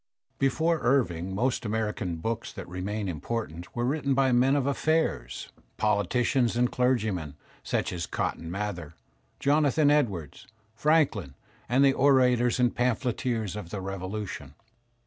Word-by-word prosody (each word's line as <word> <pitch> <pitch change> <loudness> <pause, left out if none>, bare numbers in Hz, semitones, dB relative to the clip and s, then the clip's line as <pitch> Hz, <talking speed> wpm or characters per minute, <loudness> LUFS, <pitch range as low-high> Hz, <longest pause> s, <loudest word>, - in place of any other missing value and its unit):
Before 160 +5 +2
Irving 95 -9 +1
most 125 +5 0
American 105 -4 -2
books 115 +8 -3
that - - -8
remain 100 +4 -3
important, 90 - -5
were 120 0 0
written 140 0 0
by 135 -1 +3
men 130 +3 +4
of 140 -3 +1
affairs, 155 +3 0 0.3
politicians 115 +4 +1
and 120 0 +2
clergymen 110 - 0 0.3
such - - -1
as 85 -2 -3
Cotton 80 - -3
Mather, 90 -5 -4 0.4
Jonathan 145 +1 +3
Edwards, 100 - -1 0.3
Franklin, 120 - +1 0.3
and 130 +3 +4
the 135 - +5
orators 125 -3 +3
and 125 -1 +2
pamphleteers 120 -3 -1
of 105 -5 -6
the 100 - -4
Revolution. 95 -6 -5
115 Hz, 125 wpm, -27 LUFS, 95-135 Hz, 0.4 s, the